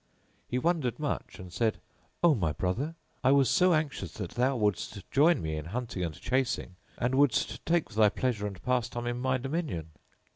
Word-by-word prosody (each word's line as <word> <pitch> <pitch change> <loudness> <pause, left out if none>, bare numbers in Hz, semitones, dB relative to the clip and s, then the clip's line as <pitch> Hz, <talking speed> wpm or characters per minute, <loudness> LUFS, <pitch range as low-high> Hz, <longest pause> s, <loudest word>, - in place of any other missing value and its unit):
He 125 - -1
wondered 150 -4 +1
much 150 -2 -3
and 90 -1 -10
said, 115 -2 0 0.4
"O 170 -2 +7
my 85 - 0
brother, 125 - -2 0.3
I 130 - +5
was 135 -3 +4
so 180 -1 +5
anxious 140 - -2
that 85 - -5
thou 130 +3 +1
wouldst 105 -2 -1
join 150 - +4
me 80 -1 -2
in 75 -1 -5
hunting 115 0 -3
and 80 -3 -4
chasing, 125 -6 -1 0.2
and 125 +2 0
wouldst 135 -3 +2
take 170 0 +2
thy 105 0 +5
pleasure 110 -2 -1
and 100 -3 -7
pastime 120 -1 -1
in 120 0 -2
my 130 +1 +1
dominion!" 135 - -3
125 Hz, 180 wpm, -29 LUFS, 100-140 Hz, 0.4 s, O